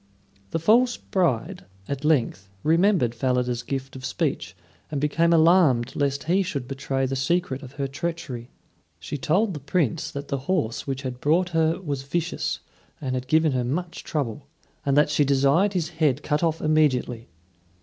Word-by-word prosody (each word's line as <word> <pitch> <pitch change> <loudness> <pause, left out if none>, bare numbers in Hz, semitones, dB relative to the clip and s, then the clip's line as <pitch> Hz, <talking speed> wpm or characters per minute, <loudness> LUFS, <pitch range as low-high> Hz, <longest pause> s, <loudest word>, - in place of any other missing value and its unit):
The - - -1
false 235 +9 +3
bride 130 - -1 0.2
at 140 0 -4
length 125 -10 +1
remembered 165 - +3
Falada's 125 0 0
gift 135 +2 -5
of 130 - -9
speech 130 - -2 0.3
and 145 - -2
became 155 +4 +2
alarmed 160 -7 +4
lest 140 -1 0
he 185 +4 +2
should 140 -9 -3
betray 135 0 -2
the 135 +1 -2
secret 135 0 0
of 130 -1 -11
her 140 -1 -2
treachery. 140 -4 -5 0.5
She 145 - -6
told 190 +9 +1
the 150 - -5
Prince 150 0 -1
that 140 0 -7
the 140 - -1
horse 145 -12 0
which 135 0 -3
had 125 -1 -5
brought 175 +5 +2
her 165 0 +1
was 145 -7 -3
vicious 165 +5 -2 0.4
and 130 -3 -3
had 130 0 -3
given 160 +1 +3
her 125 -2 0
much 165 +7 -3
trouble, 140 -2 -3 0.4
and 140 0 +1
that 150 0 +4
she 150 - +3
desired 140 +8 +3
his 170 -4 -1
head 155 -5 0
cut 150 -1 0
off 165 -1 0
immediately. 135 - +1
145 Hz, 170 wpm, -25 LUFS, 130-165 Hz, 0.5 s, alarmed